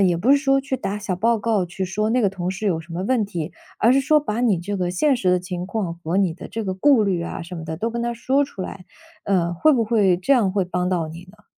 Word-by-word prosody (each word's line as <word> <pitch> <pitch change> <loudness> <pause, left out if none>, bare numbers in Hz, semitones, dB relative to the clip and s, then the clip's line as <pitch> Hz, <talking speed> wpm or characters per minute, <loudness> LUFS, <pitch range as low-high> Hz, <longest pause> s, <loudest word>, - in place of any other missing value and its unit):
也 180 -3 +3
不 215 +11 +1
是 285 - +6
说 275 -1 +2
去 270 0 -3
打 210 -5 -3
小 200 -3 -3
报 225 +5 +2
告， 210 -3 0
去 180 +2 -4
说 210 +4 -1
那 245 +2 +2
个 200 - +3
同 180 -2 -3
事 190 +3 -4
有 165 -5 +1
什 165 +1 -10
么 180 - -3
问 225 0 +1
题， 170 -5 -5 0.3
而 235 +3 +4
是 275 - +4
说 300 +3 +4
把 235 -6 -3
你 225 -7 +2
这 200 +4 -4
个 180 -2 -1
现 270 +11 +2
实 185 -3 +1
的 180 - +3
情 180 0 -5
况， 195 -4 -2
和 165 +3 -1
你 195 -4 +2
的 170 - -10
这 225 -1 -4
个 190 - -2
顾 220 +4 +4
虑 185 -4 0
啊 170 - -5
什 175 +1 -8
么 160 - -7
的 160 0 -4
都 225 +7 -2
跟 235 0 -3
他 240 0 -2
说 265 +4 +1
出 235 -9 -5
来， 185 0 -8 0.4
呃， 175 -4 +1
会 175 - +3
不 245 -6 +3
会 210 -5 +3
这 185 +10 +1
样 230 -8 +3
会 195 0 0
帮 180 0 -2
到 175 -4 -1
你 170 +3 -10
呢？ 210 +1 -23
195 Hz, 310 characters per minute, -22 LUFS, 180-235 Hz, 0.4 s, 是